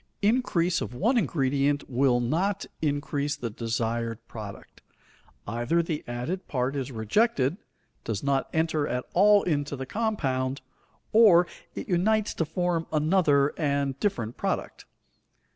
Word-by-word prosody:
Increase 195 -7 +2
of 125 - -5
one 225 - +2
ingredient 145 - +1
will 125 -1 +2
not 180 +11 0 0.2
increase 145 -1 -1
the 115 -2 -5
desired 115 0 -3
product. 105 -3 -9 0.6
Either 120 +10 0
the 160 -2 -3
added 125 +11 -4
part 130 +1 -1
is 135 -1 -3
rejected, 135 - +1 0.5
does 110 0 -3
not 140 -1 0
enter 160 -2 0
at 125 0 -2
all 205 +2 +6
into 145 -4 -1
the 135 0 -5
compound, 135 - -1 0.5
or 205 -6 +7 0.3
it - - -5
unites 210 +4 +1
to 165 - -1
form 170 +1 -1
another 150 -3 +3
and 140 -3 0
different 120 - -2
product. - - -3
145 Hz, 125 wpm, -27 LUFS, 125-175 Hz, 0.6 s, or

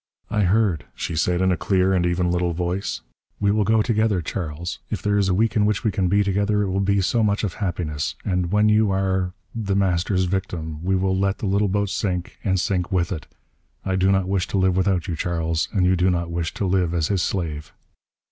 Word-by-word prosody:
"I 105 -2 +2
heard," 90 - +2
she 85 - -4
said 90 +2 +1
in 95 0 +3
a - - +2
clear 95 +1 +2
and 90 -2 +2
even 85 0 0
little 90 -1 0
voice. 90 +3 -2 0.4
"We 100 0 +2
will 105 0 +2
go 110 +1 +3
together, 110 -4 +1
Charles. 85 0 -4
If 105 - -2
there 105 0 +1
is 95 -1 +2
a - - +2
week 110 +2 +1
in 105 - +3
which 105 0 +1
we 110 - +2
can 95 -1 0
be 100 +3 +3
together, 100 +1 +1
it 100 - -2
will 95 - 0
be 100 0 +2
so 115 +5 +1
much 105 0 +1
of 100 - -1
happiness. 80 -6 -2
And 90 -3 0
when 105 +1 +3
you 105 0 +4
are 95 -1 0 0.2
The 100 -4 -2
Master's 95 0 +1
victim, 85 -4 -3
we 95 +1 +1
will 95 0 +1
let 95 0 0
the - - -5
little 100 +1 +2
boat 100 +1 0
sink, 90 -3 -3
and 95 -2 +1
sink 90 -1 -1
with 90 -2 0
it. 80 -5 -5 0.6
I 95 - 0
do 95 +1 +3
not 95 -1 +1
wish 95 -2 0
to - - -2
live 95 -1 +2
without 95 -2 +1
you, 85 - -2
Charles, 80 -1 -1
and 95 -4 +2
you 90 +1 +3
do 90 +1 +2
not 85 -1 -1
wish 85 -1 -2
to 100 - -1
live 90 -2 +1
as 80 -3 0
his 95 -3 +1
slave." 80 -5 -3
95 Hz, 235 wpm, -23 LUFS, 90-100 Hz, 0.6 s, you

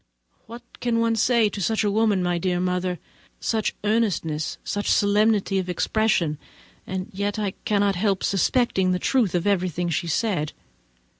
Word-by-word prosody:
What 235 +2 -10 0.2
can 235 -1 0
one 230 0 +2
say 235 0 +3
of 205 -2 -2
such 220 +3 +1
a 205 - +1
woman, 210 -3 +2
my 175 -1 0
dear 180 0 0
mother? 180 0 -1 0.4
Such 220 -2 -1
earnestness, 200 -8 0
such 205 0 -2
solemnity 205 -1 +2
of 185 -1 -4
expression! 180 -5 0 0.5
and 185 0 -4
yet 200 +2 -2
I 205 -2 -1
cannot 200 -1 +2
help 195 -1 0
suspecting 195 -2 +1
the - - +1
truth 220 -1 +1
of 175 - 0
everything 180 -3 0
she 170 +1 -1
says. 175 -2 0
200 Hz, 155 wpm, -24 LUFS, 180-220 Hz, 0.5 s, say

